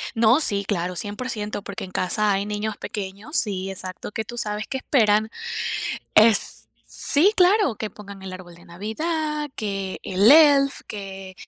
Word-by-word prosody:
No, 230 +5 +5
sí, 200 -9 0
claro, 180 -3 -2
100%, 210 +1 -4
porque 200 -1 -6
en 185 - -9
casa 200 +3 +1
hay 195 +1 -1
niños 210 0 -3
pequeños 205 - -6
sí, 195 -3 -1
exacto, 185 0 -6
que 220 - -3
tú 240 +3 -8
sabes 210 -2 -3
que 265 - -2
esperan, 220 -5 +2 0.8
es 220 0 +5 0.3
Sí, 345 +9 +3
claro, 370 - +4
que 215 - -4
pongan 200 -1 -12
el 190 -1 -7
árbol 180 -2 -11
de 170 - -17
Navidad, 300 - -3
que 195 -3 -3
el 195 +4 +4
Elf, 285 -2 +6
que 195 -2 -8
210 Hz, 155 wpm, -23 LUFS, 195-250 Hz, 0.8 s, Elf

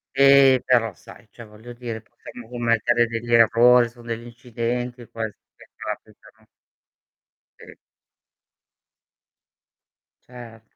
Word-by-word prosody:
Eh, 135 -1 +5
però 115 -3 +2
sai, - - -16
cioè 115 - -13
voglio 110 +3 -14
dire, 120 -2 -7
possiamo 115 +1 -14
commettere 120 0 +1
degli 115 +1 -6
errori, 120 +1 +5
son 120 0 -18
degli 115 0 -5
incidenti 120 0 -5
questi 110 -2 -7 0.2
che - - -19
capitano. - - -10 1.2
E - - -13 2.5
Cer 120 -3 -13
120 Hz, 100 wpm, -22 LUFS, 115-125 Hz, 2.5 s, Eh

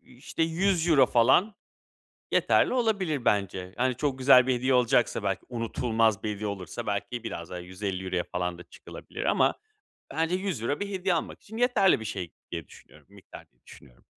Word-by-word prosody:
işte, 130 +6 -5
€100 165 -4 +3
falan 130 - +3 0.8
yeterli - - +3
olabilir 195 - 0
bence. 95 -2 0
Hani, 130 0 +1
çok 140 -3 -1
güzel 130 -1 +6
bir 130 - +3
hediye 130 +2 +1
olacaksa 125 -2 +2
belki, 95 -1 -1
unutulmaz 115 -2 0
bir 105 -1 -2
hediye 105 +1 -4
olursa 95 -4 -6
belki 100 +4 -3
biraz 85 -6 -6
daha 90 - -6
€150 95 0 -3
falan 90 -1 -2
da 85 - -11
çıkılabilir - - -9
ama - - +3 0.6
bence 165 +2 0
€100 180 - -2
bir 205 - -3
hediye 190 -2 0
almak 165 - -4
için 220 +2 -11
yeterli 225 - +3
bir 110 - -7
şey 90 -6 -5 0.2
diye 85 -4 -5
düşünüyorum - - -18
miktar - - -14
diye - - -41
düşünüyorum. 60 -3 -17
120 Hz, 165 wpm, -27 LUFS, 100-165 Hz, 0.8 s, güzel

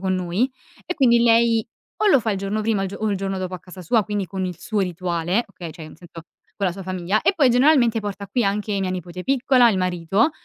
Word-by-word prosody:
con 190 0 0
noi, 185 +8 -1 0.3
e 360 - -3
quindi 240 -6 +4
lei 230 -1 +3 0.3
o 430 - +3
lo 275 -10 +5
fa 225 - -1
il 200 - -1
giorno 200 +2 -2
prima 215 -1 0
o - - 0
il - - -3
gio - - -7
o 215 -1 -1
il 200 - 0
giorno 195 0 -3
dopo 185 0 -4
a - - -6
casa 180 +2 -12
sua, 215 +5 +2
quindi 205 -2 -3
con 190 +1 -4
il 180 -3 -4
suo 215 -2 -2
rituale, 180 +3 -1
okay, 175 -4 -9
cioè 160 -1 -10
un 155 - -13
sento, 170 -1 -12 0.3
con 200 - 0
la 180 - 0
sua 195 +2 -8
famiglia 185 +2 -1
e - - +3
poi 275 -6 +4
generalmente 245 -3 +4
porta 205 -1 -6
qui 230 +4 0
anche 200 0 -1
mia 185 -1 -1
nipote 180 0 -6
piccola, 260 -2 +4
il 195 - -1
marito, 185 - +1
195 Hz, 260 wpm, -22 LUFS, 185-230 Hz, 0.3 s, lo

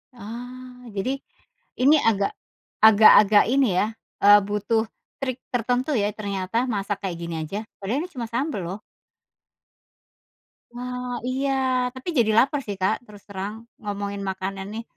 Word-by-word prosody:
Ah, 250 +3 -9
jadi 260 +8 -1 0.6
ini 290 +4 +6
agak 200 -5 +2 0.5
agak-agak 210 -1 +8
ini 270 -1 +4
ya, 210 - +2 0.4
eee, 205 0 +9
butuh 210 +2 0 0.4
trik 255 -2 -2
tertentu 245 +4 0
ya 205 0 +2
ternyata 200 0 -3
masak 205 -2 -2
kayak 180 -3 -3
gini 170 -1 -4
aja. 195 +6 -5 0.2
Padahal 225 +9 -1
ini - - -11
cuma 235 -3 -4
sambel 250 - -2
loh. 195 +4 -5 1.9
Wah, 250 0 -5
iya. 270 +2 0 0.4
Tapi 260 +6 -11
jadi 220 -2 +4
laper 275 +4 +4
sih, 200 - -3
Kak, 190 - +3
terus 205 -2 -15
terang, 200 +1 -5 0.3
ngomongin 200 -1 -4
makanan 190 0 -4
nih. 225 +1 -5
220 Hz, 135 wpm, -24 LUFS, 200-250 Hz, 1.9 s, eee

